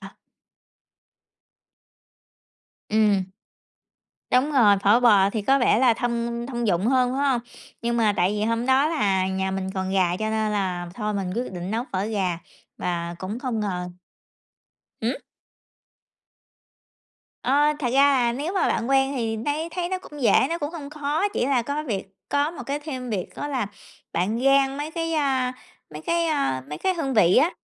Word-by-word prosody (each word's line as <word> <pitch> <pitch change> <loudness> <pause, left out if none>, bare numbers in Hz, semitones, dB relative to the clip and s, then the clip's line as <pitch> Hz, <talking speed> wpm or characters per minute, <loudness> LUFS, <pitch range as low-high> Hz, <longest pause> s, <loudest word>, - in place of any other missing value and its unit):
Ờ. - - -9 2.8
Ừm. 210 -2 +3 1.1
Đúng 260 +4 +2
rồi, 220 -7 +5
phở 210 +4 +5
bò 205 -5 +5
thì 215 0 -2
có 270 +7 +3
vẻ 245 -4 +3
là 245 -2 +4
thông 235 0 -2
thông 240 -2 -3
dụng 190 0 +1
hơn, 255 0 +3
phải 270 +2 -1
hông? 245 -3 +1 0.4
Nhưng 235 0 0
mà 220 -3 +3
tại 180 +2 +2
vì 210 0 -1
hôm 230 +1 0
đó 265 +3 +4
là 195 - +1
nhà 190 0 -1
mình 190 0 -3
còn 190 0 -2
gà, 180 -2 +2
cho 215 +2 -2
nên 220 -1 0
là 180 -4 -2
thôi 210 -1 -2
mình 195 -2 -2
quyết 245 -3 -3
định 180 +1 -5
nấu 230 +3 -1
phở 190 0 -1
gà 190 -6 -1 0.4
và 170 -1 -3
cũng 195 +6 -5
không 245 -4 -2
ngờ 180 -4 -3 1.1
hứm? 235 +4 0 2.3
Ơ, 290 +3 +3
thật 255 - -1
ra 280 +1 +5
là 240 -2 +2
nếu 290 +8 -3
mà 390 - +1
bạn 230 +2 -1
quen 270 0 +3
thì 225 -2 -1
nấy 290 +8 -2
thấy 345 +1 -3
nó 375 0 -2
cũng 295 -6 -10
dễ, 235 - +4 0.2
nó 335 - -1
cũng 290 -1 -3
hông 295 -4 -7
khó, 300 +5 -1
chỉ 395 - -1
là 265 -3 +2
có 285 +5 -3
việc 205 -9 -3 0.2
có 285 +2 +1
một 335 - -8
cái 280 +1 -2
thêm 260 -5 -6
việc 190 -5 -2
đó 290 - -4
là 260 -7 -1 0.5
bạn 205 +7 0
rang 275 0 +4
mấy 295 +2 -4
cái, 330 0 -3
a, 265 -5 +1 0.4
mấy 150 - -8
cái, 335 - +1
a, 275 - 0
mấy 150 +1 -6
cái 375 - 0
hương 280 -6 -2
vị 185 -5 +5
á, 330 - +5
235 Hz, 180 wpm, -24 LUFS, 200-280 Hz, 2.8 s, rồi